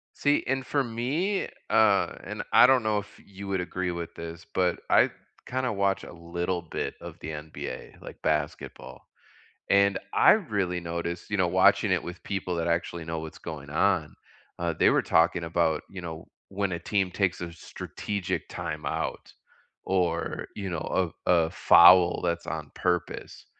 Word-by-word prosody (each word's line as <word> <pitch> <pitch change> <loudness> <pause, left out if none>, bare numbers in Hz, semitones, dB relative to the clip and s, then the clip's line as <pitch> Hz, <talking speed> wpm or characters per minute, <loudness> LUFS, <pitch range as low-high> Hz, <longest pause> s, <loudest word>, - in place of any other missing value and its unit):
See, 145 0 +2
and 135 0 -1
for 140 0 +1
me, 140 - -1 0.2
uh, 110 -3 +4
and - - -5
I - - +9
don't 130 -3 +4
know 105 -1 +1
if 105 - -8 0.2
you 100 0 -9
would 95 -1 0
agree 90 0 -3
with 85 -1 -5
this, 85 0 -8
but 90 -2 +1
I - - +5 0.4
kinda 130 -2 -1
watch 100 -1 0
a - - -10
little 85 +1 -3
bit 85 - -4
of - - -9
the 80 - -6
NBA, 75 0 -7
like - - -11
basketball. 75 -1 -3 0.6
And 100 0 +4
I - - +7
really 100 - 0
noticed, 85 +1 -4
you 105 - +1
know, 95 -2 +3
watching - - +4
it - - +1
with 90 +1 -8
people 95 -3 -2
that 85 - -1
actually 85 0 -1
know 80 0 -4
what's 80 0 -8
going 75 -4 -8
on, 80 -1 +1 0.4
uh, 85 -1 0
they - - +4
were - - +3
talking 85 +1 +2
about, 80 -1 +1
you 95 -2 -8
know, 80 -1 -7 0.2
when 100 -1 -2
a 85 - -2
team 95 +2 0
takes 90 0 0
a 85 -1 -5
strategic 95 +3 -5
time 80 -3 -5
out - - -3 0.5
or, 90 -3 -1
you 100 -2 -4
know, 85 +1 -1
a - - +3
a 80 -2 +3
foul 90 +1 +7
that's 85 -1 -1
on 75 -1 -5
purpose. 90 -1 -2
90 Hz, 170 wpm, -27 LUFS, 85-100 Hz, 0.6 s, I